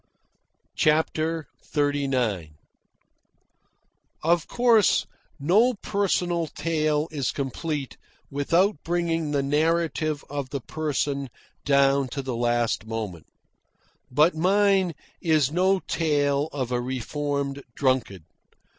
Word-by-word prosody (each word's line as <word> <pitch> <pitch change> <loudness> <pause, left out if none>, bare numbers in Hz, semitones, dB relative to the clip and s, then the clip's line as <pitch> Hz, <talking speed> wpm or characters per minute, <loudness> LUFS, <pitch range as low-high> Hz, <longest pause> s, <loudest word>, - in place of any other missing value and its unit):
CHAPTER 160 +1 +1 0.3
XXXIX 130 - 0 1.7
Of 170 +1 +2
course, 235 -4 +4 0.3
no 210 - +3
personal 180 -5 0
tale 155 -1 0
is 140 -4 -1
complete 140 +1 -4 0.3
without 165 +5 +1
bringing 165 -2 -1
the 145 -2 0
narrative 155 +1 0
of 140 -2 -4
the 140 - -3
person 140 -1 -2 0.4
down 140 -1 +3
to 140 +2 -5
the 130 -2 -3
last 120 -1 0
moment. 105 -8 -5 0.8
But 150 +7 +4
mine 190 +1 +2 0.3
is 155 -6 +2
no 185 +3 +2
tale 145 -2 0
of 130 -4 -3
a 120 0 0
reformed 140 +2 -3
drunkard. 130 - 0
150 Hz, 95 wpm, -25 LUFS, 135-165 Hz, 1.7 s, course